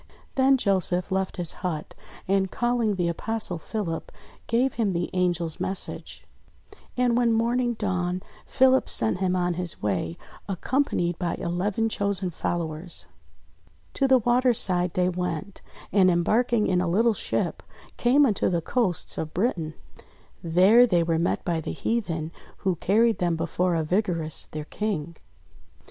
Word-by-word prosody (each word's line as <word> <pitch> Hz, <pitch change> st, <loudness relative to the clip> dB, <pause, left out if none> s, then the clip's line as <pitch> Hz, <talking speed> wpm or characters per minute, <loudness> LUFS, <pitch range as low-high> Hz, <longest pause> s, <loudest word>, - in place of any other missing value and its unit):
Then 270 Hz, 0 st, +4 dB
Joseph 190 Hz, -4 st, +1 dB
left 190 Hz, 0 st, -1 dB
his 175 Hz, -3 st, -1 dB
hut 165 Hz, -5 st, -4 dB, 0.3 s
and 190 Hz, 0 st, +1 dB
calling 240 Hz, -2 st, 0 dB
the 175 Hz, -2 st, 0 dB
Apostle 185 Hz, +1 st, -2 dB
Philip, 170 Hz, -3 st, -4 dB, 0.4 s
gave 245 Hz, +3 st, +1 dB
him 210 Hz, -5 st, 0 dB
the 175 Hz, 0 st, -3 dB
Angel's 175 Hz, -3 st, 0 dB
message. 190 Hz, 0 st, -2 dB, 0.7 s
And, 245 Hz, -1 st, +2 dB
when 240 Hz, -1 st, +3 dB
morning 240 Hz, +2 st, +1 dB
dawned, 185 Hz, -3 st, -2 dB, 0.2 s
Philip 265 Hz, 0 st, +3 dB
sent 110 Hz, +10 st, +1 dB
him 185 Hz, -1 st, +1 dB
on 180 Hz, -1 st, 0 dB
his 175 Hz, -1 st, -2 dB
way, 90 Hz, -5 st, -1 dB, 0.3 s
accompanied 190 Hz, -, -1 dB
by 175 Hz, -2 st, -1 dB
eleven 190 Hz, +5 st, -1 dB
chosen 200 Hz, -4 st, -1 dB
followers. 165 Hz, 0 st, -3 dB, 0.9 s
To 275 Hz, -, +1 dB
the 265 Hz, -1 st, +6 dB
water's 245 Hz, 0 st, +3 dB
side 180 Hz, -1 st, +3 dB
they 180 Hz, 0 st, +2 dB
went, 180 Hz, +1 st, -4 dB, 0.3 s
and 190 Hz, -2 st, +5 dB
embarking 215 Hz, +6 st, +2 dB
in 180 Hz, -1 st, +1 dB
a 180 Hz, -, -1 dB
little 225 Hz, +7 st, +3 dB
ship, -, -, -2 dB, 0.4 s
came 270 Hz, +4 st, +4 dB
unto 215 Hz, -7 st, +1 dB
the 175 Hz, -2 st, +1 dB
coasts 185 Hz, -1 st, -1 dB
of 155 Hz, -1 st, -5 dB
Britain. 170 Hz, -6 st, -1 dB, 0.7 s
There 190 Hz, +9 st, +5 dB
they 175 Hz, -6 st, +2 dB
were 165 Hz, -1 st, 0 dB
met 170 Hz, -, -1 dB
by 165 Hz, -2 st, -1 dB
the -, -, -5 dB
heathen, 170 Hz, -9 st, -2 dB, 0.3 s
who 190 Hz, -2 st, +2 dB
carried 225 Hz, +6 st, +2 dB
them 175 Hz, -2 st, +1 dB
before 170 Hz, +2 st, 0 dB
Arvigarus 165 Hz, -1 st, 0 dB
their 155 Hz, -1 st, -6 dB
King. 170 Hz, -5 st, -4 dB
185 Hz, 145 wpm, -25 LUFS, 170-225 Hz, 0.9 s, the